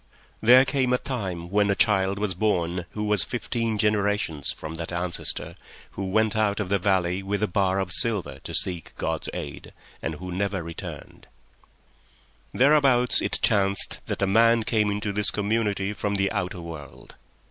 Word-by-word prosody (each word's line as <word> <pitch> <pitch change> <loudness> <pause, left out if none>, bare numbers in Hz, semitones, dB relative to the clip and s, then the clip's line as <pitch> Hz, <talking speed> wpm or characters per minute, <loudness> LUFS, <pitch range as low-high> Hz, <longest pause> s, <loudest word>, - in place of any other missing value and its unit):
There 125 +4 +7
came 130 -3 +1
a - - +4
time 95 -11 -5
when 105 0 +2
a 100 - +2
child 100 -2 +2
was 105 -2 -1
born 90 -3 -1
who 105 - -3
was 105 -3 +3
fifteen 115 -2 -2
generations 105 -8 0
from 80 +1 -7
that 80 +1 -5
ancestor 85 0 -2 0.4
who 100 - -5
went 110 +3 +1
out 105 -1 +1
of 100 -3 -3
the 100 0 +2
valley 90 -1 +1
with 100 +1 -2
a - - +2
bar 95 0 +1
of 95 -2 -2
silver 90 - 0
to - - -8
seek 90 -3 -1
God's - - -2
aid, 70 -1 -7 0.3
and 80 - -3
who 90 +3 -7
never 95 0 -2
returned. 85 0 -9 1.2
Thereabout 135 -3 +4
it - - +1
chanced 100 -1 +2
that - - -2
a - - +5
man 115 +3 +4
came 105 -2 +1
into 100 0 -2
this 105 0 +3
community 105 -1 -1
from 105 0 -2
the 95 -1 +1
outer 90 0 -3
world. 80 -4 -10
100 Hz, 170 wpm, -25 LUFS, 90-110 Hz, 1.2 s, There